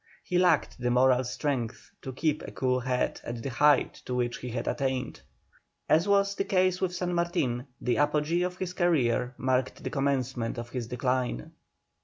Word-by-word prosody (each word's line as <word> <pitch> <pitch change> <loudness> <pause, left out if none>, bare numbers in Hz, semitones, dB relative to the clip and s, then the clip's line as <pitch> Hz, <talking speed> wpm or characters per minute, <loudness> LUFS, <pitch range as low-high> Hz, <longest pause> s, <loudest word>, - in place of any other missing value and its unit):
He 180 - 0
lacked 170 -8 +2
the 125 0 0
moral 125 +1 +4
strength 125 -2 -3
to 130 - -6
keep 150 +3 0
a - - -8
cool 130 -1 0
head 125 0 -1
at 120 -1 -6
the 135 - -3
height 145 +3 +3
to 125 - -3
which 120 -1 -1
he 125 - -6
had 115 0 -4
attained. 130 -2 -2 0.7
As 165 +5 +3
was 200 0 +3
the 195 - -1
case 185 -1 +1
with 180 -1 0
San 180 0 -2
Martin, 140 -8 0
the 125 - 0
apogee 150 +3 +2
of 180 0 -2
his 185 -1 -4
career 130 -9 +1
marked 130 0 0
the - - -3
commencement 130 -4 -1
of 120 0 -5
his 125 -3 -4
decline. 125 - -1
130 Hz, 180 wpm, -28 LUFS, 125-170 Hz, 0.7 s, moral